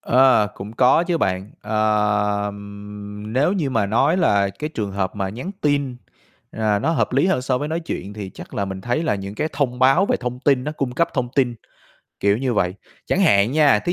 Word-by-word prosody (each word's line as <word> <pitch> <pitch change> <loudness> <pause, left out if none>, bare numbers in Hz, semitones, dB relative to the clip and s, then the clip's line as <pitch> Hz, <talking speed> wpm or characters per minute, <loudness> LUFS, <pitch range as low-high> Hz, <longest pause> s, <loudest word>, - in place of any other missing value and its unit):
Ờ, 130 -3 +4
cũng 105 +3 -8
có 125 +7 +4
chứ 175 -1 0
bạn. 95 -3 -1
Ờ, 105 -1 +1 0.8
nếu 130 - +1
như 165 -9 -1
mà 110 -5 +1
nói 135 - +2
là 100 - +3
cái 150 +10 -6
trường 105 -3 -2
hợp 95 0 -2
mà 95 -1 -1
nhắn 125 - -6
tin, 140 -3 0 0.6
ờ, 110 -2 +1
nó 140 +9 0
hợp 165 - 0
lý 140 +6 +3
hơn 190 -9 +1
so 130 -1 0
với 150 - -3
nói 165 +2 -2
chuyện 100 -10 -5
thì 100 -3 -6
chắc - - -10
là 100 - -1
mình 95 -1 -6
thấy 120 +9 -1
là 160 - +1
những 100 0 -6
cái 155 +8 -1
thông 135 -4 -1
báo 135 +9 +4
về - - +1
thông 125 0 -4
tin, 135 -2 +2
nó 150 - -3
cung 135 -5 -3
cấp 165 +7 +1
thông 125 -3 0
tin, 125 -3 +2 0.7
kiểu 100 0 +3
như 130 -1 -1
vậy. 90 -3 +1 0.3
Chẳng 190 - +1
hạn 105 - +4
nha, 145 -7 +5
thí 175 - -1
125 Hz, 220 wpm, -21 LUFS, 105-145 Hz, 0.8 s, nha